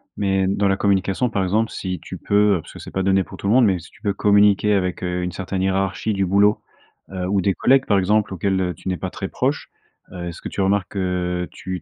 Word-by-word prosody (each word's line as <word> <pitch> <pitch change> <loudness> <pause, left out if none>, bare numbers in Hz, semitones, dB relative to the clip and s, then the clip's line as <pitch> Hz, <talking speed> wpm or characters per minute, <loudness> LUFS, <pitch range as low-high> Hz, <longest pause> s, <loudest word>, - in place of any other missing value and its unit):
mais 95 -1 +1
dans 100 +1 +1
la 95 0 +1
communication, 100 +4 +1
par 100 - 0
exemple, 110 +5 0
si 90 -3 -4
tu - - -8
peux, 100 -1 +2
heu, - - -6
parce - - -14
que - - -10
c'est - - -10
pas 95 - -1
donné 95 0 +2
pour - - -12
tout 100 - -5
le 105 - +3
monde, 125 -1 +6
mais 95 -4 +2
si 85 - -14
tu - - -23
peux 100 -3 0
communiquer 105 0 +4
avec 90 -2 -1
heu, 90 0 -2
une 90 - -2
certaine 95 0 -4
hiérarchie 95 +3 0
du 95 -1 0
boulot, 100 +3 +3 0.5
heu, 90 -1 -3
ou 100 0 +1
des 95 +1 +1
collègues, 135 +1 +3
par 100 - +3
exemple, 105 +1 +1
auxquels 95 +1 0
heu, 90 -1 -1
tu - - -12
n'es 90 -2 -1
pas - - -4
très - - -5
proche. - - -2 0.4
Heu, 90 -1 -6
est-ce 85 - -8
que - - -4
tu 100 - -3
remarques 95 -1 +1
que 90 -2 -2
tu 90 -2 -6
95 Hz, 260 wpm, -21 LUFS, 90-100 Hz, 0.5 s, monde